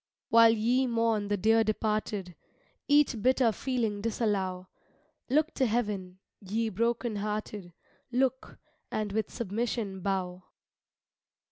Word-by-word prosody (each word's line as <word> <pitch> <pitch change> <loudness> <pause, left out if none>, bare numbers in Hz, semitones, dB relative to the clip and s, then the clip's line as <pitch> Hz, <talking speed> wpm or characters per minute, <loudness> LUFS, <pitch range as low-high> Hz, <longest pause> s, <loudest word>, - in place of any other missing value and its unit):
While 230 0 +7
ye 245 +4 +2
mourn 230 -3 +1
the 205 0 0
dear 225 +3 +4
departed, 210 -3 -2 0.5
Each 290 -6 +3
bitter 255 0 +3
feeling 225 -3 -2
disallow; 200 -5 -1 0.6
Look 305 +5 +2
to 260 - +1
heaven, 205 -5 -2 0.2
ye 220 +3 -2
broken 230 +1 -1
hearted, 210 -3 -4 0.4
Look, 260 +1 -1 0.3
and 210 -1 -2
with 215 0 -1
submission 215 -2 -3
bow. 185 -1 -3
215 Hz, 110 wpm, -29 LUFS, 200-235 Hz, 0.6 s, While